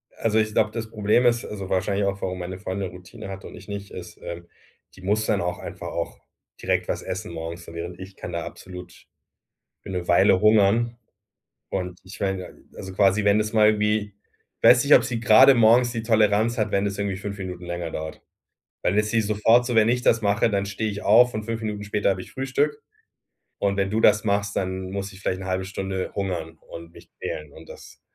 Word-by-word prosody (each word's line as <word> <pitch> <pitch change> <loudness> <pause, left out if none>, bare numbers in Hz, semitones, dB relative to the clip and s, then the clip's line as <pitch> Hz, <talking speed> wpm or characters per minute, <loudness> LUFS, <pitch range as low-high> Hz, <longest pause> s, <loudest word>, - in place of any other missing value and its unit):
Also, 110 -1 +1
ich 110 0 0
glaube, 110 0 +2
das 110 -1 -5
Problem 105 +3 +2
ist 120 -1 +2
also 100 -3 -7
wahrscheinlich 100 +2 0
auch, 100 0 -2
warum 95 -1 -3
meine 90 +1 -6
Freundin 95 0 -4
Routine 90 +2 -11
hat 95 0 -8
und - - -10
ich - - -13
nicht, 100 -1 -7
ist, - - -9
ähm, 85 0 -7 0.5
die 95 - -15
muss 105 +3 0
dann 105 - +1
auch 90 0 -3
einfach - - -7
auch - - -4 0.4
direkt - - 0
was - - -3
essen 95 +1 -5
morgens, 85 +1 -6
so, - - -11
während 85 +2 -6
ich 95 +1 -10
kann 90 - -7
da 85 0 -2
absolut 90 -2 -11 0.8
für - - -13
'ne 90 -2 -3
Weile 85 +2 +4
hungern. 110 +3 +3 0.7
Und 90 -2 -4
ich 95 +2 -12
meine 95 -2 -3 0.2
also 95 - -7
quasi, 100 +2 +3
wenn 100 +1 +4
das 105 0 -1
mal 110 -1 +5
irgendwie 105 -1 +1 0.5
weiß - - +7
nicht, - - +6
ob - - +6
sie 120 -2 -3
grade 115 +5 +7
morgens 120 +1 +5
die 115 -1 -3
Toleranz 110 +1 +2
hat, 105 -1 0
wenn 100 - +2
das 100 -1 -3
irgendwie 100 -2 -2
5 100 +1 -6
Minuten 90 -2 -6
länger 85 -1 -4
dauert. 80 0 -6 0.6
Dann 100 - +1
ist 105 0 +2
sie 115 0 +2
sofort 110 +3 +3
so: 120 -1 -2
„Wenn 110 0 +5
ich 125 +1 +1
das 115 -2 +3
mache, 100 +1 +2
dann 100 -2 0
stehe 100 +2 -3
ich 100 +1 -6
auf 120 +4 +5
und 110 0 -3
5 115 0 -3
Minuten 105 -1 -4
später 105 0 0
habe 95 -1 -1
ich - - -13
Frühstück 140 +3 -1 0.8
und 100 0 0
wenn 100 -1 0
du 110 +2 0
das 105 -1 +4
machst, 100 -1 0
dann 95 0 -3
muss 100 +1 -4
ich 95 - -14
vielleicht 95 -1 -2
'ne 95 - -7
1/2 95 0 -1
Stunde 95 -1 -4
hungern 85 -5 -4
und 85 0 -10
mich - - -16
quälen 75 -2 -5
und - - -14
das - - -13
100 Hz, 215 wpm, -24 LUFS, 95-110 Hz, 0.8 s, weiß